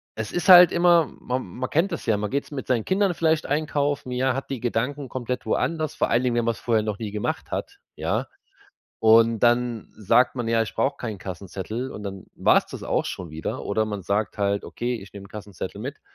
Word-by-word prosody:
es 110 -1 -4
ist 175 - -2
halt 180 -1 +10
immer, 170 -2 +4
ma 125 +1 -2
man 125 +4 -6
kennt 170 +6 +1
das 170 - -5
ja, 110 - +2
man 105 0 -2
geht's 140 +2 -2
mit 140 -3 -5
seinen 120 -4 +1
Kindern 195 -1 +2
vielleicht 160 -1 +1
einkaufen, 145 -2 -1
ja, 130 +1 +1
hat 135 - -5
die 135 - -3
Gedanken 125 +4 -2
komplett 125 0 -4
woanders, 155 -3 -1
vor - - 0
allen 120 +2 +2
Dingen, 125 -2 +1
wenn 120 - +1
man's 115 -1 -1
vorher 115 -3 +1
noch 105 -2 -3
nie 110 -2 -4
gemacht 105 0 -3
hat, - - -4 0.2
ja, - - -1 0.7
und 115 +1 +5
dann 120 -2 +2
sagt 115 +4 +3
man 120 -3 -3
ja: 115 0 +3
„Ich 110 - -6
brauche 140 +1 0
keinen 110 -6 -5
Kassenzettel“ 100 +7 -5
und 105 - -8
dann 100 -2 -6
war's - - +3
das - - -9
auch - - 0
schon 90 -3 -6
wieder 80 +1 -4
oder 110 +2 0
man 105 -2 -5
sagt 100 +4 -1
halt: 100 0 0
„Okay, 120 +1 -3
ich 95 - -13
nehme 100 -1 -10
'n - - -19
Kassenzettel 100 -2 -7
mit." - - -6
120 Hz, 220 wpm, -24 LUFS, 105-140 Hz, 0.7 s, halt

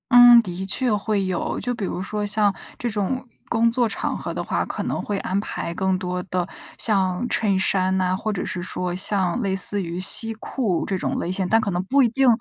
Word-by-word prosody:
嗯， 245 -1 +10
的 190 -3 -5
确 235 +5 +1
会 205 -1 0
有， 185 -2 -2
就 245 - -1
比 225 -5 -3
如 185 - -3
说 210 +1 -3
像 205 -1 +2 0.2
这 240 - -2
种 220 +5 -2 0.2
工 230 0 +3
作 240 0 +2
场 - - -2
合 - - -5
的 - - -3
话， - - -1
可 - - -4
能 - - -2
会 205 - -2
安 190 - -2
排 170 -4 -4
更 190 +1 0
多 180 -1 -3
的 180 -2 -2 0.3
像 195 0 0
衬 200 -3 +1
衫 190 0 +1
呐， 185 -1 +1
或 215 +3 -2
者 185 - -3
是 175 - -4
说 180 0 -3
像 190 +2 0
类 195 -3 0
似 200 +2 +1
于 170 -1 -4
西 225 +4 +3
裤 220 -4 -2
这 195 - -1
种 - - -2
类 175 - -2
型， 185 0 -1
但 225 +1 +4
可 205 - -1
能 175 0 0
不 275 +9 +3
一 240 - +3
定 270 +3 +2
195 Hz, 240 characters per minute, -23 LUFS, 185-225 Hz, 0.3 s, 嗯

